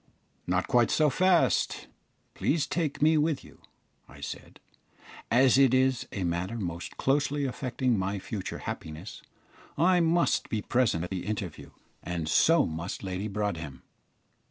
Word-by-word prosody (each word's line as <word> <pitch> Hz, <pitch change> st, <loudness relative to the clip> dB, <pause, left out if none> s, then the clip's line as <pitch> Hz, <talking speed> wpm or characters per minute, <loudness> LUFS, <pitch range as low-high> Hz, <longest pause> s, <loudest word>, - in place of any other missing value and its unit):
"Not 95 Hz, +1 st, 0 dB
quite 120 Hz, -2 st, +3 dB
so 150 Hz, -2 st, +3 dB
fast; 170 Hz, -, +2 dB, 0.5 s
please 155 Hz, -1 st, 0 dB
take 155 Hz, -4 st, -2 dB
me 155 Hz, 0 st, +5 dB
with 150 Hz, -2 st, 0 dB
you," -, -, -17 dB, 0.5 s
I -, -, -14 dB
said. -, -, -8 dB, 0.7 s
"As 130 Hz, +3 st, +5 dB
it 130 Hz, -2 st, +5 dB
is 130 Hz, -1 st, +2 dB
a 100 Hz, -, -3 dB
matter 90 Hz, +5 st, -2 dB
most 85 Hz, -5 st, -5 dB
closely 145 Hz, +1 st, +1 dB
affecting 130 Hz, -3 st, -1 dB
my 95 Hz, +2 st, -1 dB
future 100 Hz, 0 st, -5 dB
happiness, 80 Hz, +6 st, -7 dB, 0.6 s
I 180 Hz, +4 st, +4 dB
must 170 Hz, +1 st, +2 dB
be 105 Hz, -2 st, -2 dB
present 120 Hz, -10 st, +1 dB
at 90 Hz, -, -6 dB
the 95 Hz, 0 st, -4 dB
interview, 100 Hz, -6 st, -5 dB, 0.3 s
and 85 Hz, -2 st, -4 dB
so 165 Hz, -, +4 dB
must 85 Hz, +5 st, -5 dB
Lady 95 Hz, +2 st, -3 dB
Broadhem." 85 Hz, -10 st, -4 dB
115 Hz, 140 wpm, -28 LUFS, 90-140 Hz, 0.7 s, me